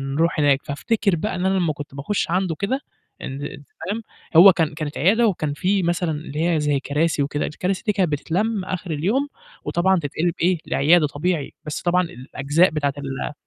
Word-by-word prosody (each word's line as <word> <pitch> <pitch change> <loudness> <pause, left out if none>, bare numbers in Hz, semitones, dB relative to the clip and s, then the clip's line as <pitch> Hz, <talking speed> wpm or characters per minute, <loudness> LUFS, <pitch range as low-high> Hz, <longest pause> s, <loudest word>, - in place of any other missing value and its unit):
نروح 165 +1 +1
هناك، 140 -2 +4
فافتكر 190 +7 0
بقى 210 +7 -2
إن 180 - -2
أنا 190 - +2
لمّا 170 -4 +1
كنت 145 -1 -9
باخُش 155 +9 -2
عنده 180 -2 0
كده 230 - -2 0.4
أند 135 +2 -6
أنت 145 0 -8 0.2
فاهم، 210 +4 -2 0.4
هو 190 +4 +10
كان 165 -2 0
كانت 150 -1 -5
عيادة 220 +9 +4
وكان 155 -7 -1
في 185 +6 +1
مثلًا 175 0 0
اللي 155 +2 -2
هي 165 -2 +2
زي 145 -2 +1
كراسي 145 +2 0
وكده 145 +1 -2
الكراسي 185 +4 -3
دي 210 - +3
كانت 185 -5 +1
بتتلَم 185 +7 -1
آخِر 185 -2 -4
اليوم 205 - 0 0.4
وطبعًا 190 +2 +2
تتقلب 165 +3 -1
إيه، 180 +1 +3
لعيادة 155 +2 +4
طبيعي 150 +1 -2
بس 150 - -4
طبعًا 180 +1 +2
الأجزاء 145 +4 +1
بتاعة 145 -3 -1
ال 140 +1 -4
165 Hz, 185 wpm, -22 LUFS, 145-185 Hz, 0.4 s, هو